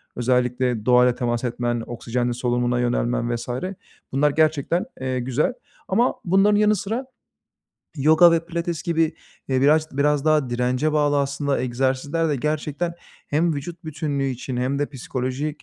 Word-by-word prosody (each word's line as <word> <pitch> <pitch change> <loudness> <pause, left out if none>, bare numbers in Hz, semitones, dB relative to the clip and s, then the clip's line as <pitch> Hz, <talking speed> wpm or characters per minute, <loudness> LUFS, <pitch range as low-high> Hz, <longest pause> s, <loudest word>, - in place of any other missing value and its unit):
Özellikle 125 -2 0
doğayla 125 0 +5
temas 120 -1 -1
etmen, 120 -1 -1
oksijenli 120 +1 -2
solunuma 120 0 0
yönelmen 120 0 0
vs. 115 - -6 0.6
Bunlar 145 +3 +3
gerçekten, 155 +4 +1 0.2
eee, 130 -1 -1
güzel 130 - 0 0.3
ama 230 +6 +2
bunların 195 +3 +4
yanı 210 0 +4
sıra, 220 +7 -3 0.9
yoga 160 +4 +6
ve 165 0 +1
pilates 170 -1 -3
gibi, 165 -2 +1 0.3
eee, 130 -1 +1
birazcı 155 +3 +4
biraz 145 0 +2
daha 155 -5 +2
dirence 125 +5 0
bağlı 145 -1 +2
aslında 140 0 -1
egzersizler 130 +6 0
de 145 - 0
gerçekten 150 +4 -2 0.3
hem 160 +2 +1
vücut 170 +5 -7
bütünlüğü 150 -3 -2
için 130 0 -4
hem 130 +3 -1
de 145 - 0
psikolojik, 135 +3 -4
140 Hz, 140 wpm, -23 LUFS, 125-155 Hz, 0.9 s, yoga